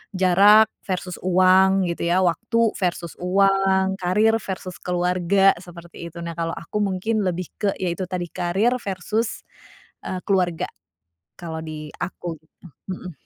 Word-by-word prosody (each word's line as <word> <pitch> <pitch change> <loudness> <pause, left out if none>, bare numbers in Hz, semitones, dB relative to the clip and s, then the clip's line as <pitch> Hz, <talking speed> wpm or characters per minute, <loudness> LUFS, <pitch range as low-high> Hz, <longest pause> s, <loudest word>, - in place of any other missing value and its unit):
jarak 200 +4 +6 0.2
versus 180 -1 -3
uang, 185 +1 +4
gitu, 170 0 -2
ya, 185 +2 +3
waktu 225 +6 +1
versus 175 -3 -2
uang, 195 0 +2
karir 210 +5 +3
versus 185 -2 -6
keluarga, 180 +2 +3
seperti 170 -1 -10
itu. 170 +1 -9
Nah, 170 0 -5
kalau 165 0 -3
aku 210 +5 -4
mungkin 205 +3 0
lebih 180 -1 -3
ke, 205 -2 +1
ya, 180 -2 -1
itu 185 0 -5
tadi, 180 -1 -2
karir 190 +7 +1
versus, 210 +4 -3 0.6
eee, 185 - -3
keluarga, 180 -4 +1 0.7
kalau 160 -2 -5
di 155 -1 -7
aku, 170 -3 -5
gitu. 160 +3 -20 0.3
Mhm. 180 -1 -7
185 Hz, 140 wpm, -23 LUFS, 175-195 Hz, 0.7 s, jarak